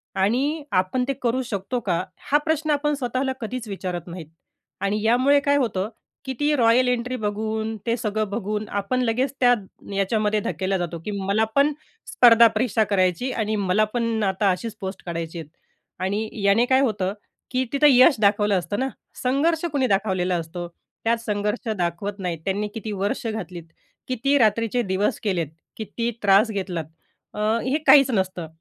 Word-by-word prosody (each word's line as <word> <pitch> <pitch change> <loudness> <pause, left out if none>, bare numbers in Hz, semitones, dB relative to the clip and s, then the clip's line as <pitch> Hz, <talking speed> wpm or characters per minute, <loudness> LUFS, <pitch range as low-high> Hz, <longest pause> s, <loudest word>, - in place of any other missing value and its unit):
आणि 265 +11 +1
आपण 185 +7 +1
ते 275 - 0
करू 245 +2 +1
शकतो 230 +2 -3
का? 180 -4 -1
हा 295 - +1
प्रश्न 315 -1 0
आपण 295 +1 +1
स्वतःला 260 0 -2
कधीच 235 0 -5
विचारत 185 -3 -5
नाहीत. 170 -3 -8 0.5
आणि 205 +2 0
यामुळे 255 +5 +4
काय 285 0 +2
होतं, 215 -6 -1 0.4
की 265 - -3
ती 295 0 +2
रॉयल 245 +1 +4
एंट्री 250 +1 -1
बघून, 220 +1 -2
ते 230 - +2
सगळं 215 -2 -2
बघून 210 0 -3
आपण 255 +6 -1
लगेच 250 +3 0
त्या 245 -1 +5 0.4
याच्यामध्ये 210 +1 +1
धक्केला 190 0 -1
जातो 170 -1 -4
की 210 - -3
मला 200 +2 0
पण 285 +2 +4 0.4
स्पर्धा 235 - +7
परीक्षा 220 0 +1
करायची 190 +6 +1
आणि 215 -1 -1
मला 200 +1 +2
पण 230 -2 0
आता 195 +1 +1
अशीच 215 +4 -4
पोस्ट 190 0 -6
काढायची 170 -1 -4
आहेत. 155 -2 -9 0.5
आणि 205 +4 -1
याने 200 +5 +4
काय 260 +1 +3
होतं, 200 -6 0 0.4
की 255 0 0
तिथं 295 +1 +5
यश 255 +3 +6
दाखवलं 205 -1 +3
असतं 180 +6 -4
ना, 265 +1 0 0.3
संघर्ष 315 +6 +1
कुणी 265 -3 +2
दाखवलेला 190 -3 +1
असतो. 170 +1 -5 0.4
त्यात 230 +1 +3
संघर्ष 210 +1 -2
दाखवत 180 +4 -3
नाहीत. 175 -4 -3
त्यांनी 205 +2 -1
किती 220 -1 -5
वर्ष 205 +6 -2
घातलीत, 185 -6 -5 0.4
किती 265 +3 +1
रात्रीचे 230 +1 +2
दिवस 200 +3 0
केलेत, 180 -7 0 0.3
किती 230 +2 -3
त्रास 200 +3 +5
घेतलात? 185 -5 -3 0.5
अ, - - -7 0.3
हे 265 +3 +1
काहीच 275 -1 +7
नसतं 185 -5 -1
215 Hz, 165 wpm, -23 LUFS, 195-250 Hz, 0.5 s, स्पर्धा